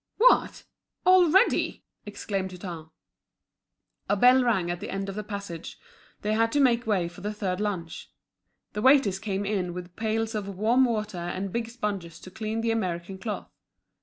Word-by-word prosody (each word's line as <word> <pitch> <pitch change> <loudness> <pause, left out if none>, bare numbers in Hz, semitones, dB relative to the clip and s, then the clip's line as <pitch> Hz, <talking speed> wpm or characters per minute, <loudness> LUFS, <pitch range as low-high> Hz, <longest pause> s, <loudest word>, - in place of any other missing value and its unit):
"What! - - +4 0.4
Already?" 370 0 +4 0.2
exclaimed 195 -2 -3
Hutin. 175 -3 -8 1.2
A 205 - +3
bell 250 +5 +6
rang 190 -8 +1
at 175 - -4
the - - -6
end 195 0 -3
of - - -4
the 210 +2 -4
passage, 200 -5 -7 0.5
they 210 +1 +1
had 225 +1 +2
to 290 - +2
make 240 -4 +3
way 190 -5 +1
for 175 +2 -12
the 205 +2 -2
third 200 -3 -2
lunch. 185 -6 -4 0.6
The 210 - -3
waiters 260 -7 +5
came 200 -1 -2
in 185 -4 -1
with 180 -1 -8
pails 225 0 -1
of 210 -2 -3
warm 235 +6 +4
water 215 -5 -2
and 185 +2 -4
big 235 -1 -2
sponges 200 -8 -4
to 185 - -11
clean 220 +2 -3
the 230 0 +1
American 190 -3 -3
cloth. 210 +1 -5
205 Hz, 165 wpm, -27 LUFS, 185-225 Hz, 1.2 s, bell